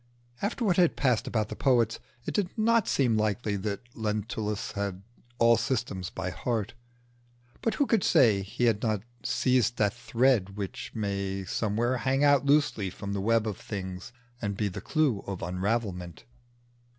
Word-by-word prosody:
After 225 +4 -1
what 185 -4 +2
had 175 -3 +4
passed 125 -5 +1
about 110 -2 -1
the - - -5
poets, 120 -4 +2 0.3
it - - -3
did 200 -4 0
not 230 0 +3
seem 120 -5 +2
likely 105 0 0
that 100 +1 -3
Lentulus 105 -1 -2
had 100 -2 -4 0.3
all 115 -1 +5
systems 110 -6 -2
by 90 -1 -4
heart; 110 +5 -2 0.9
but 225 - 0
who 285 - +2
could 225 -7 +2
say 105 -6 +5
he 95 +5 -4
had 115 -3 +3
not 110 -3 0 0.2
seized 125 -2 +2
that 105 -1 +2
thread 120 -5 +1
which 100 -2 -5
may 100 -2 -2
somewhere 115 +6 0
hang 135 +3 +1
out 145 -1 +4
loosely 140 -9 +3
from 100 +2 -6
the 100 - -2
web 115 +2 +2
of 105 -3 -3
things 95 +1 -6 0.3
and 100 -3 -2
be 105 0 0
the 90 - -7
clue 150 -10 +1
of 95 -2 -4
unravelment? 90 -2 -2
110 Hz, 165 wpm, -28 LUFS, 100-125 Hz, 0.9 s, all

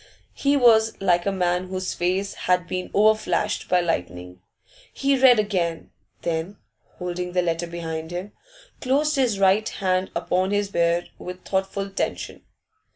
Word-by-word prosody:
He 285 0 +1
was 225 -3 +4
like 175 -1 +2
a - - +2
man 180 -1 0
whose 185 0 -3
face 185 +3 -1
had 180 -1 0
been 185 0 -4
overflashed 215 0 +1
by 180 0 +4
lightning. 90 - -4 0.5
He 275 0 +1
read 255 -2 +6
again, 185 -6 -1 0.3
then, 170 +4 -2 0.4
holding 180 0 -4
the 180 -1 +2
letter 170 0 -1
behind 160 -1 -5
him, 180 +4 -5 0.5
closed 295 +4 +1
his 250 -7 +1
right 195 +2 +3
hand 185 -1 -1
upon 180 +2 0
his 205 0 0
beard 170 0 +1
with 180 0 -8
thoughtful 195 +1 -2
tension. 195 - -3
185 Hz, 145 wpm, -24 LUFS, 175-205 Hz, 0.5 s, read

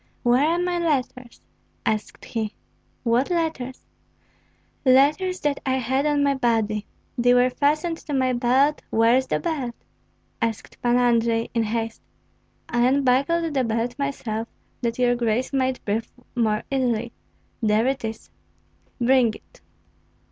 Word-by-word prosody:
"Where 250 +4 +4
are 335 +2 +2
my 355 0 0
letters?" 255 -6 -2 0.4
asked 215 -1 -2
he. 220 -2 -3 0.5
"What 240 +2 +2
letters?" 320 -7 -2 1.0
"Letters 295 +8 +3
that 290 -1 0
I 260 -1 0
had 265 +3 0
on 290 -1 +2
my 280 0 +3
body. 225 -5 0 0.3
They 245 +1 +5
were 250 +1 +4
fastened 305 +5 +1
to 295 - -7
my 260 -1 +2
belt; 260 +5 +2
where 230 +2 +4
is 260 0 +1
the - - 0
belt?" 280 -9 -3 0.7
asked 230 -2 -3
Pan 240 0 +3
Andrei, 230 -2 +2
in 230 - +1
haste. 225 +1 -2 0.7
"I 240 0 +2
unbuckled 280 +5 +2
the 265 -2 +1
belt 230 +1 -1
myself, 230 -5 -3 0.3
that 235 -1 -1
your 245 -1 +3
grace 240 +2 -1
might 260 -1 0
breathe 220 +2 -1 0.3
more 215 -3 +1
easily; 240 -3 0 0.5
there 215 +1 +2
it 265 -1 -1
is." 220 0 -6 0.7
"Bring 245 -2 +3
it." - - -18
250 Hz, 140 wpm, -24 LUFS, 230-275 Hz, 1.0 s, They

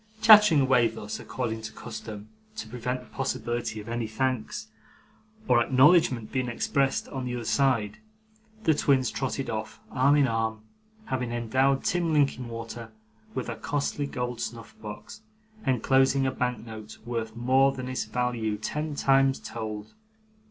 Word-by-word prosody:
Chattering 210 -8 +8
away 130 -3 +4
thus, 110 -1 -6
according 115 -3 -4
to 110 0 -6
custom, 105 -1 -8 0.3
to 110 - -6
prevent 125 +2 -3
the - - -15
possibility 120 -4 -2
of 105 - -9
any 115 -1 -2
thanks 130 +1 -2 0.8
or 120 -1 +5
acknowledgment 130 -3 +4
being 130 -2 -1
expressed 135 +3 0
on 135 -2 -4
the 125 0 -3
other 120 -1 -5
side, 120 -6 +1 0.6
the 160 - +4
twins 135 -4 +2
trotted - - -3
off, - - -4
arm 140 +3 +4
in 145 -2 +4
arm; 110 -1 -1 0.4
having 125 -2 -2
endowed 130 +4 +1
Tim 170 -2 +1
Linkinwater 120 -5 -1 0.5
with - - -3
a - - -3
costly 145 0 -2
gold 125 -3 -4
snuff 115 -2 -6
box, 110 - -9 0.5
enclosing 135 +2 +3
a 130 - +1
bank 125 -3 -2
note 110 -2 -9
worth 115 -2 -3
more 130 +3 +4
than 130 -1 -6
its 130 0 -2
value 120 -4 -1
ten 150 +7 -3
times 135 -1 +3
told. 110 -2 -6
125 Hz, 145 wpm, -27 LUFS, 115-135 Hz, 0.8 s, Chattering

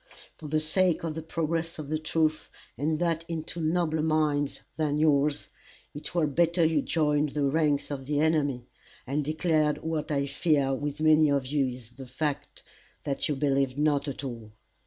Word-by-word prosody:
For 155 - -9
the 155 +1 +1
sake 170 +3 +2
of 165 -2 -2
the 160 - -5
progress 165 +1 -2
of 150 -2 -7
the 155 - 0
truth, 155 0 0 0.3
and 155 +5 0
that 165 -1 0
into 165 0 -4
nobler 160 -1 +1
minds 150 -2 0
than 150 -2 0
yours, 145 -1 +2 0.4
it 145 +4 -8
were 170 -3 +3
better 170 +3 +2
you 155 -2 +2
joined 150 -1 +1
the 145 - +1
ranks 145 0 +1
of 135 -2 -5
the 145 0 0
enemy, 145 -5 +1 0.4
and 145 +3 -1
declared 155 0 +1
what 160 -1 -2
I 140 -1 +1
fear 140 -1 +1
with 145 +2 -3
many 155 -1 +5
of 140 -2 +1
you 140 0 +1
is 125 -2 -8
the 130 +1 -10
fact, 140 +3 -4 0.4
that 140 +1 -1
you 150 - +1
believe 135 -1 +1
not 145 -1 +1
at 140 0 -5
all. 115 -5 -7
150 Hz, 180 wpm, -28 LUFS, 140-160 Hz, 0.4 s, many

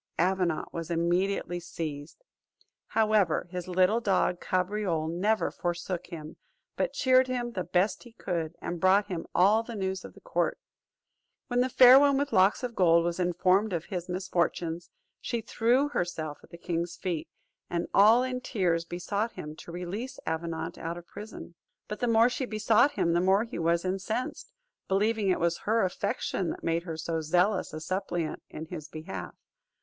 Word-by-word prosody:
Avenant 180 -2 0
was 165 -1 -5
immediately 175 +1 0
seized. 160 - -6 0.6
However, 215 -7 +2
his 180 -1 -5
little 185 +5 +3
dog 190 -5 +1
Cabriole 185 -3 0
never 200 +7 0
forsook 175 0 -3
him, 160 -3 -9 0.4
but - - -1
cheered 260 -1 +4
him 245 -1 -2
the 185 -6 -3
best 180 +4 +1
he 240 -2 -14
could, 170 -6 -3
and 175 - -3
brought 195 +3 +4
him 175 -3 -4
all 200 +5 +5
the 230 0 -8
news 190 -2 -2
of - - -11
the - - -14
court. - - -1 0.9
When 245 0 +2
the 255 - +1
Fair 255 +1 +9
One 280 -1 +4
with 285 0 -1
Locks 190 +6 +4
of 245 -1 -3
Gold 170 -4 +4
was 175 +1 -2
informed 185 +3 +2
of 170 -1 -2
his 180 -3 -5
misfortunes, 175 -2 -1 0.3
she 235 - -2
threw 240 +5 +1
herself 165 - -3
at - - -17
the 170 - -11
king's 170 0 -3
feet, 175 -4 -3 0.4
and 170 0 -1
all 220 +5 +6
in 255 -1 -3
tears 175 -9 0
besought 200 +6 -3
him 150 0 -7
to 170 - -10
release 180 +9 -5
Avenant 160 0 -3
out 165 +1 -4
of 175 - -10
prison. 210 -4 -10 0.3
But 210 - -5
the 245 - 0
more 230 0 +5
she 250 +1 -2
besought 225 +5 +3
him 170 - +1
the 175 - +3
more 190 +3 +3
he 230 -5 -6
was 170 +1 +1
incensed, 195 +6 -3 0.4
believing 210 +1 +1
it 185 - +2
was 170 0 0
her 225 +1 +1
affection 185 -1 -2
that - - -6
made 165 +1 0
her 165 -3 -5
so 160 0 -2
zealous 180 +6 +1
a 155 - -6
suppliant 175 -1 -3
in 155 - -7
his 160 -2 -7
behalf. 155 - -7
185 Hz, 175 wpm, -28 LUFS, 170-215 Hz, 0.9 s, Fair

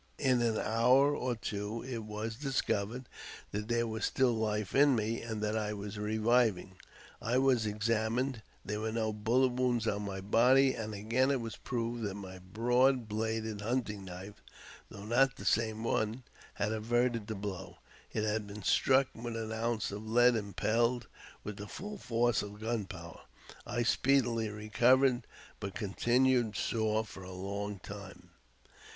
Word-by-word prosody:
In 130 -3 +2
an 115 -2 +1
hour 125 +6 +4
or 125 -3 -1
two 105 +1 -4
it 125 -3 -4
was 105 +1 -4
discovered 125 -3 -1 0.4
that 105 +1 -3
there 120 0 +1
was 110 -1 -4
still 130 -2 +2
life 105 -2 -1
in 140 -1 +5
me, 110 +1 -1
and 110 -2 -4
that 105 +1 0
I 105 -1 -1
was 105 0 -6
reviving. 110 -3 +1 0.4
I 120 +4 +1
was 130 -4 +3
examined: 115 +4 0 0.2
there 105 +1 -2
was 110 +1 -2
no 110 -1 0
bullet 115 +5 +2
wound 120 -2 0
on 105 -1 0
my 100 -2 -4
body, 125 +7 +4
and 110 -1 -5
again 115 +6 +1
it 140 -2 +2
was 115 -2 -5
proved 120 0 -3
that 100 -3 -3
my 95 -2 -8
broad 120 +6 +2
bladed 110 0 -2
hunting 110 -3 -2
knife 95 +3 -9 0.5
(though 100 0 -9
not 130 +4 +3
the - - -9
same 110 0 +1
one) 115 +2 0 0.3
had 105 +1 -1
averted 115 0 0
the 110 - -3
blow. 95 -2 -6 0.3
It 110 - -1
had 105 -1 -1
been 100 0 -8
struck 135 +6 +4
with 115 0 -5
an 110 -1 -4
ounce 110 -1 -1
of 105 +2 -6
lead 120 +1 +5
impelled 115 +3 0 0.4
with 105 -1 -6
the 105 - -7
full 205 - -7
force 120 - +1
of 105 0 -8
gunpowder. 100 -7 -4 0.5
I 120 - 0
speedily 120 -3 +2
re 105 +1 -8
covered, 125 +1 +4 0.3
but 100 -1 -5
continued 120 +2 +2
sore 110 -1 0
for 95 - -11
a 90 0 -8
long 100 +2 -4
time. 100 +1 -10
110 Hz, 160 wpm, -32 LUFS, 105-120 Hz, 0.5 s, in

